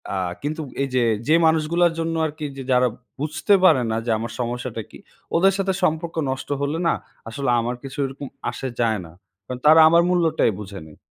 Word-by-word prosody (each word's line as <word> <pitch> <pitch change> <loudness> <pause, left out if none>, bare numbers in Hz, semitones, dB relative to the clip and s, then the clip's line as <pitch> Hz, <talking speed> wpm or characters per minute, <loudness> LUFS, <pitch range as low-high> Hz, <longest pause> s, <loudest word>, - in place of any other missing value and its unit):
আ - - -1 0.2
কিন্তু 155 +2 -3 0.2
এই 135 - -3
যে, 125 - +3 0.2
যে 155 - +5
মানুষগুলার 165 +2 +2
জন্য 165 0 -1
আরকি 155 0 -5
যে 135 - -5
যারা 125 0 +4 0.3
বুঝতে 155 +7 0
পারে 135 -9 +6
না 110 - 0
যে 120 - 0
আমার 115 +2 -5
সমস্যাটা 120 -1 -3
কি - - -13 0.4
ওদের 195 +3 +4
সাথে 195 -1 0
সম্পর্ক 165 0 0
নষ্ট 130 +1 -4
হলে 145 +3 -1
না - - +3 0.4
আসলে 135 +2 -3
আমার 120 +2 -2
কিছু 135 -1 -8
ওরকম 135 +1 -7 0.2
আসে 135 - -5
যায় 110 -3 +1
না। 80 - -13 0.3
কারণ 125 +3 -6
তারা 160 +2 +8
আমার 170 +1 +5
মূল্যটাই 165 - +2
বুঝে 100 -1 -8
নেই। 75 - -16
145 Hz, 195 wpm, -22 LUFS, 125-165 Hz, 0.4 s, তারা